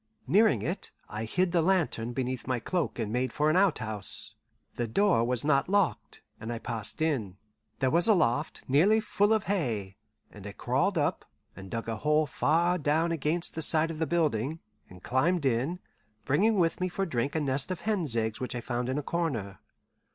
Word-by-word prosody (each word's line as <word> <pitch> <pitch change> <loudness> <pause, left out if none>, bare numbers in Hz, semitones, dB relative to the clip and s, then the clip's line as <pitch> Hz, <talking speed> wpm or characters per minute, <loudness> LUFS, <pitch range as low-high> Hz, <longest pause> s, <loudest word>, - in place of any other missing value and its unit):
Nearing 215 +3 +3
it, 180 - -3 0.2
I 110 +2 -4
hid 180 +10 0
the 170 -1 +3
lantern 160 -10 +1
beneath 130 0 -3
my 130 -2 0
cloak 180 +8 -2
and 110 -2 -3
made 125 0 0
for 150 +4 +2
an - - +1
outhouse. 110 - -1 0.4
The 120 - -2
door 185 - +3
was 125 +2 0
not 150 +2 +2
locked, 200 -4 0 0.2
and 110 +2 -5
I 120 - -3
passed 115 +5 -2
in. 115 - -1 0.4
There 130 -1 +1
was 170 +4 +3
a 220 - +6
loft 150 -3 0
nearly 180 +12 +4
full 210 -1 +1
of 220 -2 +3
hay, 115 - -2 0.3
and 105 -1 -10
I 100 - -7
crawled 135 - 0
up, 145 -2 0 0.3
and 95 0 -10
dug 115 +2 -4
a 115 -1 -2
hole 150 +5 +2
far 170 +5 +1
down 160 +3 +1
against 165 +2 -1
the 160 - -4
side 160 +1 +4
of 155 - -7
the 160 - 0
building, 150 -2 0 0.3
and 90 0 -14
climbed 150 +5 +1
in, 135 +7 0 0.5
bringing 210 +10 +2
with 170 0 +1
me 185 - 0
for 195 +2 -2
drink 140 -3 -2
a - - +2
nest 140 0 -1
of 185 - -4
hen's 180 - -1
eggs 110 -1 -1
which 125 - -4
I - - -2
found 120 +1 -3
in 130 - -1
a 150 - -2
corner. 120 - -2
150 Hz, 195 wpm, -29 LUFS, 120-175 Hz, 0.5 s, a